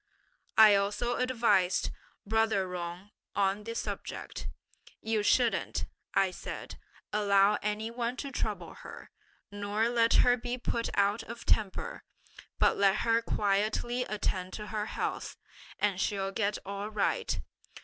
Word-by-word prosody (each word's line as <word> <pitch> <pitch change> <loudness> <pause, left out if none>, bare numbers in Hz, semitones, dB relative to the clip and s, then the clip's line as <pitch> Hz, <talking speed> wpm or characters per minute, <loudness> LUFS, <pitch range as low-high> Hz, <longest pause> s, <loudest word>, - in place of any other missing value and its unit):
"I 215 -1 +9
also 205 +5 +1
advised 230 -8 +2 0.3
brother 220 -2 +2
Jung 175 +3 -6 0.2
on 200 +1 +1
the 230 0 -5
subject: - - -5 0.5
'You 220 -1 0
shouldn't,' 235 +3 +2 0.3
I 190 -1 +3
said, - - -7 0.3
'allow 200 0 +4
any 210 +2 -2
one 240 +1 -2
to 280 +1 -5
trouble - - -3
her; - - -11 0.4
nor 205 +2 0
let 230 -1 +3
her 245 0 +5
be 245 +1 -3
put 235 -1 -2
out 200 +2 +2
of 235 +1 -9
temper, 220 - 0 0.5
but - - +3
let 195 0 +3
her 230 0 +3
quietly 215 +3 0
attend 190 -4 -2
to 210 - -5
her 210 0 -1
health, - - -3 0.4
and 200 -2 +1
she'll 195 -1 -1
get 205 0 0
all 200 +1 -4
right. 210 -2 0
210 Hz, 130 wpm, -30 LUFS, 200-230 Hz, 0.5 s, I